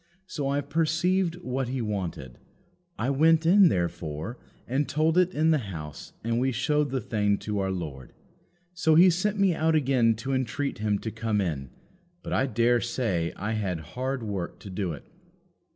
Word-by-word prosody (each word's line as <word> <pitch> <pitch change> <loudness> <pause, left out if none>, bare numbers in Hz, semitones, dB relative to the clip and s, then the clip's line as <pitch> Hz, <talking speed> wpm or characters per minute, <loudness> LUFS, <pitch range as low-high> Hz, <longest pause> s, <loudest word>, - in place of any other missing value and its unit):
So 145 -7 -3
I 140 +1 +1
perceived 165 +4 +1
what 130 0 -2
he 130 +1 -3
wanted. 95 - -4 0.6
I 120 +5 0
went 160 +3 +4
in, 185 +1 +7
therefore, 85 +4 -3 0.3
and 135 +4 0
told 155 +2 +2
it 180 0 +4
in 160 +2 +3
the 155 - +3
house, 75 -5 -8
and 115 +1 0
we 130 +1 +1
showed 150 +4 +1
the 130 - -1
thing 105 -4 0
to 105 -1 -2
our 95 -1 0
Lord. 75 -9 -5 0.6
So 160 -3 +3
He 180 +3 +7
sent 200 +4 0
me 195 -3 +4
out 160 0 +1
again 130 -6 +3
to 130 +5 -4
entreat 130 +1 -2
him 105 -1 +1
to 110 - -5
come 110 -1 -1
in; 75 -9 -2 0.5
but - - -4
I 135 - +2
dare 120 -1 +2
say 105 -9 -1
I 105 +2 -3
had 100 -6 -2
hard 130 0 -2
work 100 -5 -4
to 100 - -9
do 95 -2 -2
it." 75 - -8
125 Hz, 180 wpm, -27 LUFS, 100-155 Hz, 0.6 s, in